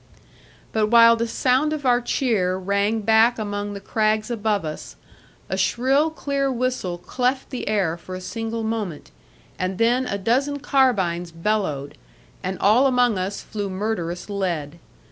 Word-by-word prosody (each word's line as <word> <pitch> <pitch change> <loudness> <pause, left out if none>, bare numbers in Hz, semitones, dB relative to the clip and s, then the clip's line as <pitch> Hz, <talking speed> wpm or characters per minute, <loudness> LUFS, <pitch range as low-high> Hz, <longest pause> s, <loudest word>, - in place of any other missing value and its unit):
But 215 -1 +1
while 230 +1 +7
the 230 0 -1
sound 260 +6 +1
of 295 -3 -5
our 245 -1 +4
cheer 215 -8 0
rang 200 +3 0
back 225 +3 +4
among 205 -1 -3
the 200 - -6
crags 215 +2 0
above 210 -5 0
us, 155 0 -7 0.5
a 190 - -2
shrill 260 +10 +2
clear 280 -3 -1
whistle 250 -8 -2
cleft 255 +8 -2
the 255 - -5
air 195 -6 0
for 185 +2 -8
a - - -5
single 225 +4 -4
moment, 215 -8 -4 0.5
and 185 0 -2
then 245 +3 +2
a 200 - -2
dozen 260 +8 0
carbines 200 -12 +1
bellowed, 165 -6 -2 0.4
and 185 0 -3
all 230 +7 +4
among 245 -5 +2
us 190 +2 -3
flew 205 -2 -5
murderous 185 -3 -3
lead. 170 -6 -3
215 Hz, 150 wpm, -23 LUFS, 190-245 Hz, 0.5 s, while